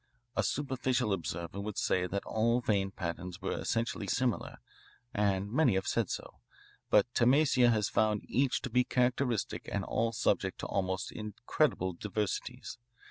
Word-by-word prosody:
A -, -, +3 dB
superficial 130 Hz, -6 st, 0 dB
observer 85 Hz, +1 st, -4 dB
would 105 Hz, 0 st, -5 dB
say 90 Hz, -1 st, +1 dB
that 100 Hz, +2 st, -3 dB
all 115 Hz, +2 st, +2 dB
vein 100 Hz, -5 st, +1 dB
patterns 90 Hz, 0 st, -5 dB
were 100 Hz, -, -2 dB
essentially 115 Hz, +1 st, -1 dB
similar, 125 Hz, -2 st, -1 dB, 0.6 s
and 100 Hz, -1 st, +1 dB
many 130 Hz, -5 st, +3 dB
have 95 Hz, -, 0 dB
said -, -, 0 dB
so, -, -, -6 dB, 0.5 s
but 105 Hz, +4 st, +4 dB
Tamassia 130 Hz, 0 st, +4 dB
has 110 Hz, -3 st, +2 dB
found 105 Hz, -1 st, +1 dB
each 135 Hz, +1 st, +1 dB
to -, -, -4 dB
be 125 Hz, 0 st, +4 dB
characteristic 125 Hz, -2 st, 0 dB
and -, -, -1 dB
all 115 Hz, 0 st, 0 dB
subject 115 Hz, -, 0 dB
to -, -, -4 dB
almost 95 Hz, 0 st, -1 dB
incredible 100 Hz, -3 st, -1 dB
diversities. 105 Hz, +6 st, -4 dB
105 Hz, 145 wpm, -32 LUFS, 95-125 Hz, 0.6 s, but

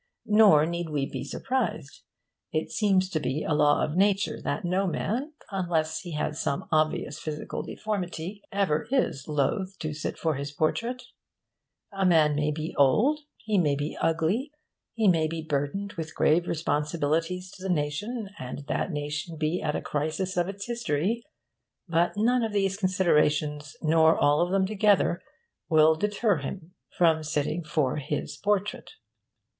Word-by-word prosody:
Nor 210 Hz, -8 st, +6 dB
need 170 Hz, 0 st, -3 dB
we 145 Hz, -3 st, 0 dB
be 130 Hz, -1 st, -5 dB
surprised. 165 Hz, -, -3 dB, 0.5 s
It 155 Hz, -, -2 dB
seems 195 Hz, -3 st, +2 dB
to 155 Hz, -, 0 dB
be 150 Hz, 0 st, -2 dB
a -, -, 0 dB
law 150 Hz, 0 st, +4 dB
of 150 Hz, -, -2 dB
nature 200 Hz, +1 st, +2 dB
that 210 Hz, -, -2 dB
no 185 Hz, +2 st, +1 dB
man, 245 Hz, -, -2 dB, 0.2 s
unless 170 Hz, -5 st, 0 dB
he 175 Hz, -3 st, -7 dB
has 150 Hz, +1 st, -2 dB
some 140 Hz, -, -2 dB
obvious 155 Hz, -2 st, +1 dB
physical 155 Hz, -1 st, -4 dB
deformity, 195 Hz, -2 st, -4 dB
ever 195 Hz, -6 st, 0 dB
is 245 Hz, -, 0 dB
loth 185 Hz, +6 st, -1 dB
to 155 Hz, -2 st, -4 dB
sit 155 Hz, -, -4 dB
for 160 Hz, -1 st, 0 dB
his 140 Hz, +1 st, -4 dB
portrait. 235 Hz, +12 st, -1 dB, 0.9 s
A 195 Hz, 0 st, -1 dB
man 160 Hz, -5 st, +5 dB
may 150 Hz, +1 st, +1 dB
be 155 Hz, +1 st, -3 dB
old, 220 Hz, -, +4 dB, 0.2 s
he 215 Hz, -3 st, 0 dB
may 150 Hz, -5 st, +2 dB
be 145 Hz, +2 st, -3 dB
ugly, 165 Hz, -, +1 dB, 0.5 s
he 220 Hz, -2 st, +2 dB
may 165 Hz, -4 st, +4 dB
be 160 Hz, 0 st, -4 dB
burdened 155 Hz, +7 st, -2 dB
with 160 Hz, -1 st, -6 dB
grave 170 Hz, +3 st, +3 dB
responsibilities 165 Hz, +3 st, -1 dB
to -, -, -14 dB
the 190 Hz, -, -4 dB
nation, 180 Hz, -, -2 dB
and 130 Hz, +2 st, -6 dB
that -, -, -1 dB
nation 150 Hz, +2 st, -4 dB
be 155 Hz, +3 st, -1 dB
at 150 Hz, -, -1 dB
a -, -, -3 dB
crisis 155 Hz, +6 st, -2 dB
of 175 Hz, +1 st, +1 dB
its 200 Hz, 0 st, -6 dB
history; 230 Hz, -2 st, -1 dB, 0.7 s
but 170 Hz, +1 st, +2 dB
none 245 Hz, +4 st, +3 dB
of 225 Hz, -2 st, -2 dB
these 195 Hz, -1 st, +1 dB
considerations, 150 Hz, -6 st, +1 dB
nor 160 Hz, 0 st, +5 dB
all 145 Hz, +2 st, +3 dB
of 175 Hz, -, +1 dB
them 195 Hz, 0 st, +3 dB
together, 200 Hz, -3 st, +2 dB, 0.5 s
will 155 Hz, 0 st, +6 dB
deter 205 Hz, +3 st, +1 dB
him 160 Hz, +5 st, -7 dB, 0.2 s
from 165 Hz, -2 st, +4 dB
sitting 155 Hz, +2 st, -1 dB
for 150 Hz, -4 st, 0 dB
his 150 Hz, 0 st, -3 dB
portrait. 205 Hz, -, -1 dB
165 Hz, 160 wpm, -27 LUFS, 150-195 Hz, 0.9 s, Nor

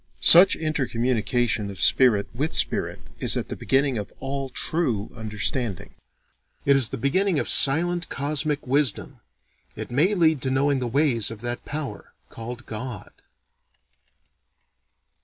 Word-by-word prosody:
Such 180 Hz, +3 st, +9 dB
intercommunication 120 Hz, -7 st, -2 dB
of 95 Hz, -3 st, -9 dB
spirit 105 Hz, -, +3 dB
with 145 Hz, +7 st, -3 dB
spirit -, -, +1 dB, 0.2 s
is -, -, +5 dB
at -, -, -5 dB
the -, -, -5 dB
beginning 135 Hz, -3 st, 0 dB
of 105 Hz, -, -8 dB
all 135 Hz, 0 st, -5 dB
true 125 Hz, -10 st, -1 dB
understanding. 110 Hz, 0 st, -2 dB, 0.7 s
It 140 Hz, -, +4 dB
is 130 Hz, -5 st, +1 dB
the -, -, -6 dB
beginning 180 Hz, -, 0 dB
of -, -, -2 dB
silent 170 Hz, +5 st, +1 dB
cosmic 145 Hz, +1 st, -3 dB
wisdom: 135 Hz, -2 st, -2 dB, 0.6 s
it -, -, -8 dB
may 165 Hz, +11 st, +1 dB
lead 160 Hz, -6 st, +1 dB
to 130 Hz, -, -3 dB
knowing 135 Hz, +1 st, 0 dB
the 125 Hz, -, -3 dB
ways 125 Hz, -4 st, 0 dB
of 115 Hz, -2 st, -10 dB
that 120 Hz, 0 st, -5 dB
power 150 Hz, -1 st, -7 dB, 0.2 s
called 120 Hz, +2 st, -9 dB
God. 110 Hz, -1 st, -8 dB
135 Hz, 135 wpm, -23 LUFS, 115-150 Hz, 0.7 s, Such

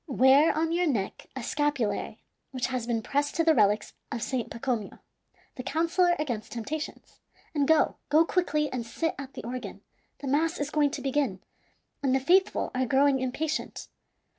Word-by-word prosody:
Wear 270 Hz, +3 st, +5 dB
on 325 Hz, +1 st, +1 dB
your 350 Hz, +1 st, +1 dB
neck 215 Hz, -10 st, -2 dB
a 260 Hz, -, -5 dB
scapulary 290 Hz, -4 st, -1 dB, 0.3 s
which 255 Hz, -2 st, -2 dB
has 255 Hz, -3 st, -3 dB
been 230 Hz, -2 st, -1 dB
pressed 290 Hz, +4 st, -1 dB
to 330 Hz, -, +2 dB
the 325 Hz, -1 st, +5 dB
relics 210 Hz, -4 st, +2 dB, 0.2 s
of 235 Hz, -1 st, -3 dB
Saint 255 Hz, -3 st, -2 dB
Pacomio, 230 Hz, -3 st, -3 dB, 0.6 s
the -, -, -3 dB
counsellor 340 Hz, +5 st, +2 dB
against 245 Hz, -8 st, -3 dB
temptations, 285 Hz, +7 st, -6 dB, 0.3 s
and 285 Hz, -3 st, +1 dB
go, 320 Hz, -1 st, +3 dB
go 310 Hz, +3 st, +5 dB
quickly, 305 Hz, -4 st, +1 dB
and 250 Hz, -2 st, -2 dB
sit 325 Hz, +8 st, -2 dB
at 275 Hz, -1 st, -8 dB
the -, -, -7 dB
organ. 245 Hz, +2 st, -6 dB, 0.4 s
The 280 Hz, -, -7 dB
mass 320 Hz, +5 st, +1 dB
is 290 Hz, 0 st, -2 dB
going 295 Hz, -2 st, +3 dB
to 290 Hz, -, -6 dB
begin, 270 Hz, -8 st, 0 dB, 0.6 s
and 265 Hz, -2 st, +2 dB
the -, -, +3 dB
faithful 365 Hz, +8 st, +2 dB
are 255 Hz, 0 st, 0 dB
growing 270 Hz, +2 st, +3 dB
impatient. 295 Hz, +5 st, -3 dB
275 Hz, 170 wpm, -28 LUFS, 250-310 Hz, 0.6 s, Wear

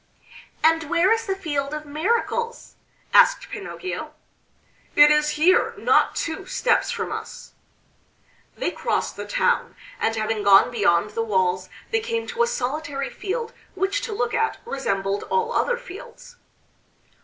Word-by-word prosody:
"And 325 Hz, -1 st, +3 dB
where 345 Hz, +3 st, +3 dB
is 455 Hz, 0 st, +1 dB
the 385 Hz, -, 0 dB
Field 290 Hz, -6 st, -3 dB
of 305 Hz, 0 st, -6 dB
Miracles?" 460 Hz, +9 st, -2 dB, 0.4 s
asked -, -, +5 dB
Pinocchio. 370 Hz, -, -6 dB, 0.8 s
"It 295 Hz, 0 st, +8 dB
is 300 Hz, 0 st, +2 dB
here, 350 Hz, +5 st, +3 dB
not -, -, +3 dB
two 355 Hz, +4 st, -4 dB
steps 470 Hz, +4 st, +1 dB
from -, -, -3 dB
us." -, -, -7 dB, 1.1 s
They -, -, -1 dB
crossed -, -, -2 dB
the -, -, -7 dB
town, -, -, 0 dB, 0.2 s
and 225 Hz, -, 0 dB
having 215 Hz, 0 st, -1 dB
gone 200 Hz, +3 st, +6 dB
beyond 205 Hz, -3 st, +2 dB
the 230 Hz, -, -2 dB
walls 185 Hz, -4 st, 0 dB, 0.2 s
they 450 Hz, -, +2 dB
came 460 Hz, 0 st, -3 dB
to 475 Hz, 0 st, -2 dB
a 470 Hz, -, +4 dB
solitary 275 Hz, -, -3 dB
field 455 Hz, +4 st, -4 dB, 0.2 s
which 390 Hz, +6 st, 0 dB
to -, -, -5 dB
look 425 Hz, -, -1 dB
at 450 Hz, -, 0 dB
resembled 200 Hz, -, -2 dB
all 470 Hz, 0 st, 0 dB
other 485 Hz, -, +1 dB
fields. 485 Hz, +1 st, -12 dB
325 Hz, 145 wpm, -23 LUFS, -, 1.1 s, It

